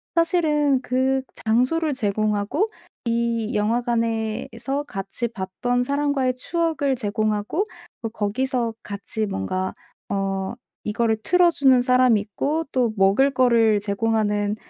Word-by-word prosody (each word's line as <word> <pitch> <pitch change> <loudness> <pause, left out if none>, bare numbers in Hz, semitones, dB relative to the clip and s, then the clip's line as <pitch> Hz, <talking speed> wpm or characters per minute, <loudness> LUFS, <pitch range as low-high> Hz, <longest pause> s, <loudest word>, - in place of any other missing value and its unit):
사실은 305 -5 +2
그 260 +1 +1 0.2
장소를 255 +8 +2
제공하고, 215 - 0 0.4
이 235 0 0
영화관에서 230 +3 -1
같이 195 +3 -4
봤던 230 +5 -1
사람과의 280 -1 0
추억을 320 -2 0
제공하고, 215 - -1 0.4
뭐 225 -2 -4
거기서 235 +2 -1
같이 210 +2 -4
뭔가 185 - -2 0.4
어 195 0 -1 0.3
이거를 220 +1 +1
틀어 360 -1 +4
주는 265 -5 +4
사람 250 -2 +4
있고 280 +10 -2
또 245 -3 +1
먹을 195 +8 +4
거를 235 -5 +4
제공하는 210 0 0
235 Hz, 250 characters per minute, -23 LUFS, 210-270 Hz, 0.4 s, 틀어